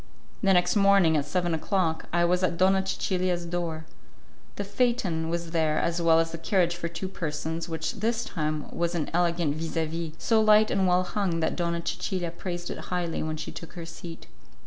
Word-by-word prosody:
The 195 - +4
next 180 0 +3
morning, 195 -5 +5
at 145 -2 +1
seven 175 +2 0
o'clock, 160 0 0
I 175 0 +3
was 180 +1 +2
at 175 -2 0
Donna 190 +1 +4
Cecilia's 185 -2 -1
door. 170 -2 -3 0.7
The 205 - -3
phaeton 200 -6 0
was 170 0 -3
there 160 -2 +1
as 170 0 0
well 165 -1 +5
as 165 0 0
the 165 - -6
carriage 175 -1 +1
for 175 -1 -3
two 170 +3 -5
persons, 160 -1 -4
which 160 -1 -2
this 230 +2 0
time 155 -3 -2
was 170 0 0
an 160 -3 -2
elegant 170 -3 +1
vis 165 +1 -4
a 160 - +2
vis, 165 0 -4
so 225 +4 +3
light 215 0 +5
and 195 -1 +2
well 180 0 +3
hung 185 -3 -1
that 160 - 0
Donna 170 -1 -1
Cecilia 180 -3 -2
praised 175 0 -5
it - - -6
highly 175 -2 -2
when 155 0 -2
she - - -5
took 165 - -9
her 170 -2 -7
seat. 165 0 -9
170 Hz, 200 wpm, -27 LUFS, 165-185 Hz, 0.7 s, morning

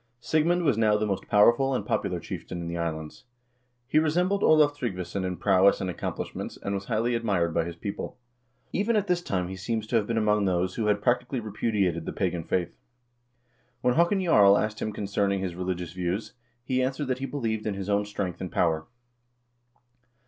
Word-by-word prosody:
Sig 155 +6 +1
mund 175 0 +2
was 140 -8 +2
now 105 -2 +4
the 110 - 0
most 100 -3 -3
powerful 120 +6 +4
and 105 - -2
popular 90 -4 -1
chieftain 90 +1 -6
in 85 - -5
the 85 - -4
is 85 - -3 0.2
lands. 80 - -10 0.6
He 150 +4 +3
resembled 180 +6 +1
Olav 150 -4 +5
Tryggvason 95 -7 -3
in 90 -1 -3
prowess 95 +1 +4
and 95 - -2
accomplish - - -5
ments, - - -6
and 100 - -4
was 100 0 -3
highly 115 +4 0
admired 100 -8 0
by 80 - +1
his 85 0 -6
people. 100 +7 -5 0.6
Even 215 +4 +1
at 205 -2 +2
this 180 -2 +1
time 90 - -2
he 95 - -6
seems 110 +3 -3
to 115 +2 +1
have 105 -2 0
been 115 - -1
among 105 -2 +2
those 90 0 0
who 110 -2 -1
had 105 0 +1
practically 125 +2 +1
repudiated 100 -6 -1
the - - -3
pagan 90 -3 -1
faith. 85 0 -2 1.0
When 125 0 +3
Haakon 170 +6 +3
Jarl 100 - +6
asked 105 0 -2
him 110 - -1
concerning 100 -1 -1
his 95 -2 -3
religious 90 -1 -4
views, 90 +3 -3 0.3
he 130 +1 0
answered 135 +3 -1
that 130 -1 -2
he 135 - -3
believed 110 -7 -2
in 105 - -1
his 95 -1 -5
own 100 0 +2
strength 100 -4 -4
and 95 - -4
power. 80 -2 +1
105 Hz, 200 wpm, -27 LUFS, 95-125 Hz, 1.0 s, Jarl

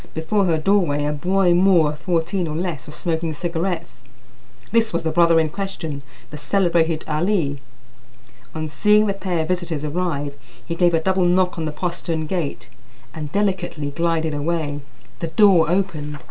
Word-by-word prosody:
Before 190 +6 +1
her 165 -3 +2
doorway 155 -4 +2
a 150 - 0
boy 180 +4 +2
Moor 175 -3 +4
of 150 0 -7
fourteen 175 +1 -1
or 155 - -4
less 160 -6 -3
was 150 - -8
smoking 165 -2 -2
cigarettes; 170 -4 -3 0.7
this 225 0 +2
was 170 - -2
the 160 - 0
brother 170 0 +5
in 160 -1 +1
question, 165 -5 -5 0.3
the 150 - -7
celebrated 165 0 +1
Ali. 155 -3 0 1.0
On 155 0 -3
seeing 210 +8 +3
the 200 - 0
pair 185 -4 -2
of - - -6
visitors 175 -4 -2
arrive, 150 -3 -2 0.3
he 170 - -3
gave 175 0 +3
a - - +3
double 185 +2 +1
knock 180 0 +2
on 160 - -2
the 155 - -2
postern 165 0 -3
gate 150 -8 -3 0.5
and 150 -2 -6
delicately 185 -7 -1
glided 165 0 0
away. 145 -1 -2 0.4
The 165 - -2
door 180 -3 +5
opened. 155 -5 -1
165 Hz, 165 wpm, -21 LUFS, 155-185 Hz, 1.0 s, brother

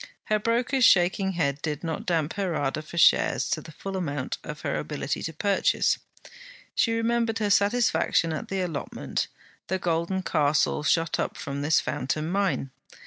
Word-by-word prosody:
Her 215 - +4
broker's 240 +4 +1
shaking 190 -1 +4
head 140 -5 -1
did 150 -1 -3
not 165 -1 -4
damp 165 -3 0
her 190 -4 -2
ardour 145 +1 -1
for 155 +2 -10
shares - - +4
to - - 0
the - - -11
full 195 +6 -6
amount 145 -8 -3
of - - -7
her - - -1
ability - - -3
to 160 - -3
purchase. 195 +5 +1 0.7
She 230 - +2
remembered 230 0 +1
her 210 -2 0
satisfaction 200 -5 +2
at 155 - -4
the 195 -1 -2
allotment; 165 -6 -3 0.4
the 190 - 0
golden 175 +2 -1
castle 150 -3 +2
shot 165 +1 +1
up - - -2
from 140 0 -4
this 150 +2 +3
fountain 155 +5 -2
mine. 185 -9 0
175 Hz, 165 wpm, -26 LUFS, 155-200 Hz, 0.7 s, Her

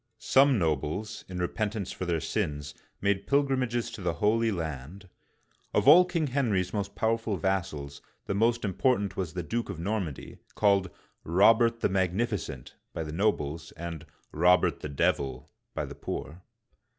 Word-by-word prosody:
Some 135 +3 +4
nobles, 80 +5 -2
in 90 - -6
repentance 105 +2 -2
for 95 - -5
their 85 -2 +1
sins, 75 0 -3 0.3
made 100 0 0
pilgrim 140 -2 +2
ages 120 -1 -1
to - - -8
the 90 -2 0
Holy 115 +2 +2
Land. 80 +2 -5 0.7
Of - - +2
all 175 +5 +9
King 170 -3 -1
Henry's 115 -10 0
many 100 -2 -1
pow 115 +1 +2
erful 110 -5 -3
vassals, 75 -6 -2 0.2
the - - -2
most 115 +3 +2
important 100 0 +1
was 90 -4 -3
the 90 -1 -3
Duke 115 +9 -3
of 100 - -5
Nor 105 +5 -1
mandy, 75 -7 -7 0.2
called 100 -3 +3 0.3
Robert 115 +7 +4
the - - +2
Magnificent" 95 - -1 0.2
by 80 - -3
the 75 - -6
nobles, 80 -5 -1
and 80 -1 -7 0.2
" - - -33
Robert 90 +3 +3
the 75 - -6
Devil 70 -2 -1
" - - -52
by - - -1
the - - -8
poor. 85 +4 -6
95 Hz, 165 wpm, -28 LUFS, 80-115 Hz, 0.7 s, all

